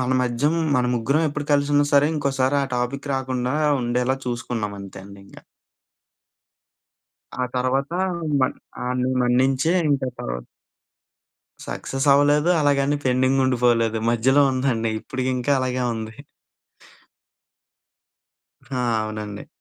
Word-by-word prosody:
మన 130 Hz, 0 st, 0 dB
మధ్యం 125 Hz, +6 st, 0 dB, 0.2 s
మన 125 Hz, -, +2 dB
ముగ్గురం 140 Hz, +7 st, +1 dB
ఎప్పుడు 145 Hz, 0 st, -5 dB
కలిసున్నా 145 Hz, 0 st, +3 dB
సరే 145 Hz, 0 st, +5 dB
ఇంకోసారా 140 Hz, -1 st, +1 dB, 0.2 s
టాపిక్ 140 Hz, +4 st, -3 dB
రాకుండా 130 Hz, 0 st, -2 dB, 0.3 s
ఉండేలా 125 Hz, +2 st, 0 dB
చూసుకున్నాం 115 Hz, -3 st, -3 dB
అంతే 95 Hz, 0 st, -9 dB
అండి 100 Hz, 0 st, -13 dB
ఇంకా... -, -, -14 dB, 2.0 s
ఆ -, -, +2 dB
తర్వాత 130 Hz, +4 st, 0 dB, 0.5 s
మన్ 130 Hz, -, +1 dB, 0.3 s
ఆడిని 125 Hz, +1 st, -1 dB
మన్నించే 130 Hz, +6 st, +2 dB, 0.2 s
ఇంకా 135 Hz, -2 st, 0 dB
తర్వా -, -, -4 dB, 1.3 s
సక్సెస్ 135 Hz, +2 st, -3 dB
అవ్వలేదు. 145 Hz, +3 st, +3 dB
అలాగని 145 Hz, -1 st, +2 dB
పెండింగ్ 130 Hz, +1 st, +2 dB
ఉండిపోలేదు. 120 Hz, -3 st, +2 dB
మధ్యలో 130 Hz, +5 st, +3 dB
ఉందండి 130 Hz, -4 st, 0 dB
ఇప్పటికింకా 130 Hz, +1 st, -2 dB
అలాగే 130 Hz, -1 st, -1 dB
ఉంది. 110 Hz, +1 st, -7 dB, 2.5 s
ఆ! 130 Hz, -, -5 dB, 0.2 s
అవునండి. 105 Hz, -1 st, -6 dB
130 Hz, 105 wpm, -22 LUFS, 120-140 Hz, 2.5 s, సరే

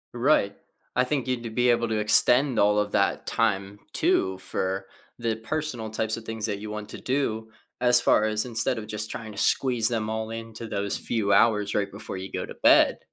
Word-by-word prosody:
Right, 120 Hz, -5 st, +2 dB, 0.4 s
I 125 Hz, 0 st, +3 dB
think 135 Hz, -2 st, -2 dB
you'd 125 Hz, -2 st, -1 dB
to 115 Hz, -, -5 dB
be 125 Hz, +2 st, +1 dB
able 120 Hz, 0 st, +1 dB
to 110 Hz, -, -1 dB
extend 120 Hz, +4 st, +4 dB
all 105 Hz, +1 st, +4 dB
of 105 Hz, 0 st, 0 dB
that -, -, +1 dB
time, 100 Hz, -3 st, -1 dB
too, 95 Hz, 0 st, +1 dB
for 95 Hz, 0 st, -3 dB, 0.3 s
the 115 Hz, -1 st, -1 dB
personal 120 Hz, -2 st, -4 dB
types 110 Hz, +1 st, -2 dB
of 115 Hz, -, -9 dB
things 110 Hz, -1 st, -4 dB
that 100 Hz, -2 st, -3 dB
you 105 Hz, 0 st, -7 dB
want 105 Hz, -1 st, -6 dB
to -, -, -9 dB
do, 110 Hz, -5 st, -2 dB, 0.3 s
as 125 Hz, -1 st, +5 dB
far 110 Hz, -2 st, +3 dB
as 110 Hz, +2 st, -1 dB
instead 115 Hz, +1 st, -1 dB
of 110 Hz, -, -5 dB
just 110 Hz, 0 st, -4 dB
trying 115 Hz, -3 st, -7 dB
to 100 Hz, -, -12 dB
squeeze 120 Hz, -5 st, +2 dB
them 110 Hz, -2 st, -1 dB
all 110 Hz, 0 st, -3 dB
into 115 Hz, 0 st, -7 dB
those 100 Hz, -1 st, -2 dB
few 105 Hz, -4 st, -1 dB
hours 105 Hz, -3 st, +3 dB
right 100 Hz, -1 st, -1 dB
before -, -, -7 dB
you 95 Hz, +1 st, -7 dB
go -, -, -3 dB
to -, -, -9 dB
bed, -, -, +4 dB
110 Hz, 210 wpm, -26 LUFS, 105-120 Hz, 0.4 s, as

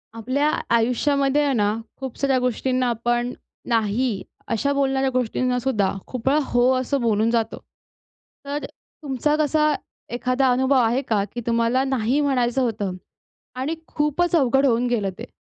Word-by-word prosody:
आपल्या 260 Hz, +6 st, 0 dB, 0.3 s
आयुष्यामध्ये 275 Hz, +4 st, +2 dB
आहे 285 Hz, -1 st, +1 dB
ना, 210 Hz, -3 st, +2 dB, 0.2 s
खूप 265 Hz, -3 st, -6 dB
साऱ्या 275 Hz, -2 st, +2 dB
गोष्टींना 255 Hz, +1 st, 0 dB
आपण 240 Hz, +1 st, 0 dB, 0.4 s
नाही 225 Hz, -1 st, 0 dB, 0.3 s
अशा 280 Hz, +6 st, +1 dB
बोलणाऱ्या 270 Hz, -1 st, +1 dB
गोष्टींना 250 Hz, 0 st, 0 dB
सुद्धा 225 Hz, -7 st, +1 dB, 0.2 s
खूपवेळा 265 Hz, +4 st, +1 dB
हो 245 Hz, +1 st, +4 dB
असं 265 Hz, +1 st, -1 dB
बोलून 220 Hz, -1 st, +2 dB
जातो. 230 Hz, -1 st, 0 dB, 0.9 s
तर 285 Hz, +1 st, -3 dB
तुमचा 295 Hz, 0 st, -3 dB
कसा 305 Hz, 0 st, +2 dB, 0.4 s
एखादा 255 Hz, +2 st, +1 dB
अनुभव 260 Hz, +2 st, +2 dB
आहे 240 Hz, +2 st, +2 dB
का? 220 Hz, -6 st, 0 dB
की 240 Hz, -, -4 dB
तुम्हाला 235 Hz, +2 st, +2 dB
नाही 265 Hz, 0 st, 0 dB
म्हणायचं 265 Hz, -3 st, +1 dB
होतं 210 Hz, -6 st, -1 dB, 0.6 s
आणि 270 Hz, +6 st, -2 dB
खूपच 305 Hz, +4 st, 0 dB
अवघड 270 Hz, -2 st, +3 dB
होऊन 245 Hz, -1 st, +2 dB
गेलं 220 Hz, -5 st, 0 dB
ते? -, -, -8 dB
255 Hz, 140 wpm, -23 LUFS, 235-275 Hz, 0.9 s, हो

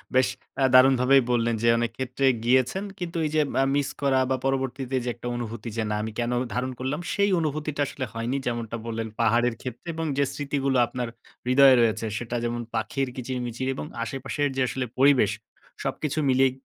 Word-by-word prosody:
বেশ 130 Hz, 0 st, +5 dB, 0.3 s
আ -, -, +4 dB
দারুণভাবেই 130 Hz, +1 st, +6 dB
বললেন। 115 Hz, -1 st, +2 dB
যে, 115 Hz, -, +2 dB
অনেক 120 Hz, 0 st, 0 dB
ক্ষেত্রে 130 Hz, +1 st, -1 dB, 0.2 s
গিয়েছেন 130 Hz, +9 st, +2 dB, 0.2 s
কিন্তু 170 Hz, -1 st, -4 dB
এই 150 Hz, -, -2 dB
যে, 155 Hz, -, +4 dB, 0.2 s
আ -, -, +4 dB
মিস 145 Hz, -1 st, +1 dB
করা 135 Hz, -2 st, +3 dB
বা 130 Hz, -, +1 dB
পরবর্তীতে 135 Hz, -1 st, -1 dB
যে 125 Hz, -, -2 dB
একটা 120 Hz, -, -7 dB
অনুভূতি 115 Hz, -1 st, -5 dB
যে, 110 Hz, -, +1 dB
"না, 105 Hz, -, 0 dB
আমি 110 Hz, -, -4 dB
কেন 120 Hz, +1 st, 0 dB, 0.2 s
ধারণ 125 Hz, +2 st, -1 dB
করলাম?" 135 Hz, +5 st, -2 dB
সেই 200 Hz, 0 st, +2 dB
অনুভূতিটা 150 Hz, -1 st, -2 dB
আসলে 130 Hz, -, -4 dB
হয়নি, 115 Hz, +4 st, -2 dB
যেমনটা 115 Hz, -1 st, -3 dB
বললেন 115 Hz, 0 st, -3 dB
পাহাড়ের 120 Hz, +1 st, +3 dB
ক্ষেত্রে 125 Hz, +5 st, -8 dB
এবং 165 Hz, -, -2 dB
যে 140 Hz, -, +4 dB
স্মৃতিগুলো 140 Hz, -2 st, -1 dB
আপনার 125 Hz, 0 st, -4 dB, 0.4 s
হৃদয়ে 135 Hz, +1 st, +7 dB
রয়েছে, 110 Hz, -1 st, +1 dB
সেটা 120 Hz, 0 st, -4 dB
যেমন 120 Hz, 0 st, -2 dB
পাখির 135 Hz, -1 st, -1 dB
কিচির-মিচির 125 Hz, 0 st, -3 dB
এবং 140 Hz, -, -5 dB, 0.2 s
আশেপাশের 135 Hz, +4 st, -2 dB
যে 135 Hz, -, 0 dB
আসলে 130 Hz, 0 st, -2 dB
পরিবেশ, 135 Hz, -7 st, +5 dB, 0.5 s
সবকিছু 155 Hz, 0 st, -2 dB
মিলিয়ে 130 Hz, 0 st, +4 dB
130 Hz, 180 wpm, -26 LUFS, 120-135 Hz, 0.5 s, হৃদয়ে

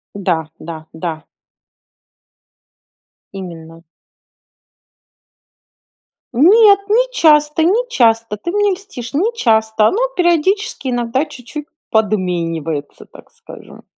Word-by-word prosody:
Да 185 Hz, -4 st, 0 dB, 0.2 s
да 160 Hz, -1 st, -8 dB
да. 160 Hz, -2 st, -5 dB, 2.1 s
Именно. 165 Hz, -3 st, -10 dB, 2.5 s
Нет, 400 Hz, -, +6 dB
не 485 Hz, +4 st, +3 dB
часто 300 Hz, -5 st, +3 dB
не 445 Hz, +9 st, +2 dB
часто, 230 Hz, -, +2 dB
ты 345 Hz, -, -5 dB
мне 415 Hz, 0 st, +1 dB
льстишь, 360 Hz, -, -9 dB
не 375 Hz, +11 st, +1 dB
часто. 220 Hz, -, +2 dB
Ну, 435 Hz, -, -1 dB, 0.2 s
периодически 345 Hz, -2 st, 0 dB
иногда 245 Hz, +3 st, -1 dB
чуть-чуть 290 Hz, +3 st, -9 dB, 0.2 s
подменивается, 170 Hz, -8 st, -2 dB
так -, -, -17 dB
скажем. -, -, -14 dB
240 Hz, 90 wpm, -17 LUFS, -, 2.5 s, Нет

